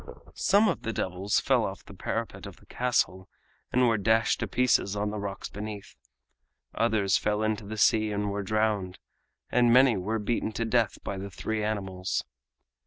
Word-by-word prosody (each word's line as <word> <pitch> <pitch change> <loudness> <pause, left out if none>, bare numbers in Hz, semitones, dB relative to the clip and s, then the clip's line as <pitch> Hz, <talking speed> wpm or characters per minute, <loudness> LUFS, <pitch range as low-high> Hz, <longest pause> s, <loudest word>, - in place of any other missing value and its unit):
Some 205 +3 +3
of - - -1
the 115 - -3
devils 95 +2 0
fell - - +2
off - - -5
the - - -12
parapet - - -4
of - - -10
the - - -22
castle 105 -7 -1 0.4
and 125 0 +3
were 115 -3 +2
dashed 110 +2 +2
to - - -2
pieces 125 -5 +2
on 105 0 -1
the 105 - -4
rocks 100 -1 -5
beneath; 105 -1 -7 0.8
others 110 -4 +2
fell 105 +1 0
into 110 -1 -1
the 110 +1 -6
sea 110 +1 +3
and 105 0 -1
were 100 +1 -2
drowned; 105 -2 0 0.6
many 125 0 +5
were 105 +5 -1
beaten 110 +1 -2
to 115 - -2
death 115 -2 +1
by 100 - -4
the 100 +1 -6
three 110 +3 -3
animals. 95 -3 -2
105 Hz, 175 wpm, -28 LUFS, 100-115 Hz, 0.8 s, many